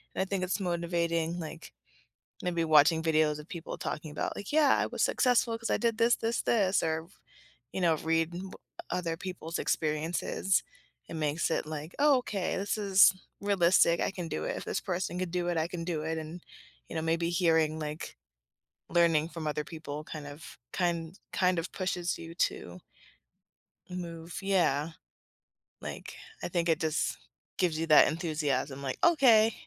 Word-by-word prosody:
And - - 0
I - - +1
think 190 -1 -2
it's 185 +3 -1
motivating, 170 -2 -1
like, 160 0 -8 0.7
maybe 170 -2 0
watching 160 +1 +5
videos 155 -2 +2
of 150 +2 -11
people 170 -2 -6
talking 150 0 -4
about 150 - -3
like, 200 - -7
Y"eah, 305 -1 +5
I - - +1
was - - -3
successful 240 -2 +3
'cause 230 - -4
I - - +2
did 230 -2 +1
this, 235 +1 +4
this, 230 +1 -1
this", 200 -5 +2
or, 160 0 -1 0.7
you 190 - -3
know, 165 -2 +4
read 165 +1 0
w 185 +2 -6 0.4
other 175 -2 -1
people's 180 -2 -5
experiences. 160 +4 0 0.5
It - - -7
makes 155 +2 0
it - - 0
like, 155 +1 -6
"Oh, 285 -2 +5
okay, 205 -6 -2
this 200 +2 -1
is 195 -2 +6 0.3
realistic, 180 -4 +4
I - - +1
can 180 -3 -5
do - - -3
it. - - -2
If - - -7
this - - -1
person 180 -1 -3
can 185 -1 -2
do 175 0 -1
it, 175 - 0
I 160 - 0
can 170 -1 -5
do 165 -3 -2
it." 160 +1 -2
And, 160 +2 -7 0.5
you - - -6
know, 160 - -1
maybe 165 +1 0
hearing 160 -3 +2
like 150 0 -5 0.7
learning 165 -2 +3
from 165 -3 -6
other 150 0 -1
people 155 -2 -7
kind 150 -2 -7
of 145 +1 -10
kind 170 0 -1
kind 180 -2 +2
of 165 - -6
pushes 180 -2 -2
you 165 0 -9
to 90 - -2 1.1
move 170 -2 -6
yeah. 170 -6 +2 0.9
Like, - - -7 0.3
I - - -1
think 175 -1 0
it 160 - +3
just 160 -2 0 0.4
gives 165 -4 +1
you 165 - -1
that 155 -2 +8
enthusiasm, 150 -4 -1
like, 130 - -3
"Okay, 235 -10 +6
170 Hz, 175 wpm, -30 LUFS, 160-185 Hz, 1.1 s, that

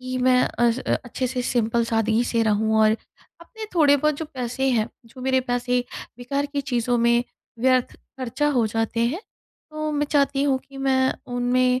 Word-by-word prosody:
कि 255 0 -4
मैं 250 0 +4
अ, 240 0 +1
स 235 - -2 0.3
अच्छे 255 +2 -3
से 250 0 -2
सिंपल 235 -1 +1
सादगी 225 0 +1
से 230 -1 +1
रहूँ। 220 0 +1
और 215 0 +5 0.5
अपने 435 +6 -9
थोड़े 295 -4 +5
बहुत 305 +1 +1
जो 320 - -4
पैसे 255 +1 -1
हैं, 225 -2 +1 0.2
जो 255 +3 -14
मेरे 260 0 +2
पैसे 245 0 0 0.4
बेकार 275 +4 -2
की 285 0 -3
चीज़ों 245 -2 0
में 235 +1 +3 0.4
व्यर्थ 255 0 +2 0.2
खर्चा 260 +4 -1
हो 230 - +3
जाते 225 +1 -1
हैं, 320 +11 -2 0.5
तो 310 0 -3
मैं 295 0 0
चाहती 280 -2 +1
हूँ 275 -2 +2
कि 275 - -13
मैं 260 -1 +2 0.2
उनमें 250 +1 +2
250 Hz, 185 wpm, -23 LUFS, 235-275 Hz, 0.5 s, और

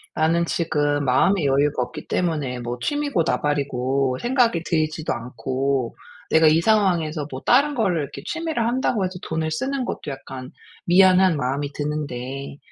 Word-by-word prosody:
"나는 165 +2 +2
지금 145 -4 0
마음의 155 +7 +3
여유가 140 -1 +2
없기 - - -9
때문에 150 -8 -1
뭐 120 +1 -5
취미고 290 -10 0
나발이고 135 -2 0
생각이 240 -9 +2
들지도 155 -1 -1
않고 130 +1 -2 0.4
내가 160 0 +5
이 155 +2 +4
상황에서 170 -8 +1
뭐 130 - -6
다른 290 +1 +4
거를 190 - +1
이렇게 140 - -7
취미를 325 -8 -2
한다고 240 -4 0
해서 185 - -4
돈을 160 0 -2
쓰는 265 - -2
것도 155 - -5
약간 130 -1 -8 0.3
미안한 185 -1 +5
마음이 140 +2 -2
드는데 140 -2 -4
155 Hz, 335 characters per minute, -22 LUFS, 135-185 Hz, 0.4 s, 내가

